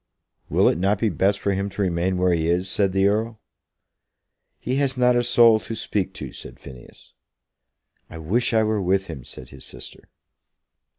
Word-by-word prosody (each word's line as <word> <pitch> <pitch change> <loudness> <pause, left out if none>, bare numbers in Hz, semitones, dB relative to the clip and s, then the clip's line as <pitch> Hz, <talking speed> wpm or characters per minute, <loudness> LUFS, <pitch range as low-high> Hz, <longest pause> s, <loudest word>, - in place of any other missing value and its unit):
"Will - - +3
it - - +1
not 100 +3 +1
be 110 +2 0
best 100 +3 +1
for 100 - -1
him 100 +1 -2
to 100 - -5
remain 90 +1 0
where 90 0 +2
he 80 -1 0
is?" 90 +2 0
said 95 0 +1
the 95 +1 +1
Earl. 110 +2 -1 1.2
"He 130 +2 -2
has 135 -2 0
not 125 0 +3
a 120 - +3
soul 115 -2 +5
to 115 - -7
speak 100 -3 -2
to," - - -7
said - - -11
Phineas. 65 -3 -14 1.0
"I - - -9
wish 100 +10 0
I 110 -1 +3
were 110 -1 0
with 95 +1 +1
him," 80 -8 -8
said 60 0 -11
his - - -12
sister. - - -10
100 Hz, 185 wpm, -23 LUFS, 90-110 Hz, 1.2 s, soul